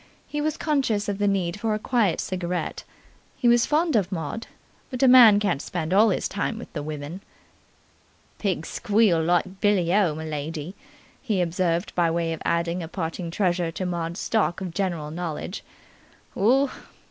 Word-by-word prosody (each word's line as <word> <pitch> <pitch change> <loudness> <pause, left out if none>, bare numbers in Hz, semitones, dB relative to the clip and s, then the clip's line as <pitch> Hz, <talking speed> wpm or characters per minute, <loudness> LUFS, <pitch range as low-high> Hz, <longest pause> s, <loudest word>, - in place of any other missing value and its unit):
He 295 - -4
was 310 +1 -1
conscious 260 -9 0
of 200 -1 -2
the 205 - +2
need 195 -1 0
for 220 0 0
a - - -1
quiet 215 -4 +1
cigarette. 180 -1 -3 0.5
He 245 - +1
was 240 0 +4
fond 315 0 +2
of 195 -3 +1
Maud, 170 +5 -4 0.4
but 255 0 -2
a - - +6
man 240 -5 +8
can't 200 -9 0
spend 170 -1 -3
all 215 +3 +6
his 190 - 0
time 205 +3 -3
with 235 - -10
the 150 - -3
women. 150 +4 -6 1.2
"Pigs 185 -6 -1
squeal 205 -6 +2
like 175 +3 0
billy 185 -4 +2
o, 190 -7 +3
m'lady!" 155 +1 -5 0.5
he 215 -8 -1
observed 175 0 0
by 170 -2 +2
way 165 0 -1
of 160 - -7
adding 170 +1 0
a 165 - -5
parting 170 0 -4
treasure 175 -2 0
to 185 - -3
Maud's 170 0 -3
stock 220 -6 0
of 185 -3 -5
general 170 -6 -2
knowledge. 175 +3 -5 0.7
"Oo! 255 +7 +3
185 Hz, 170 wpm, -25 LUFS, 170-215 Hz, 1.2 s, man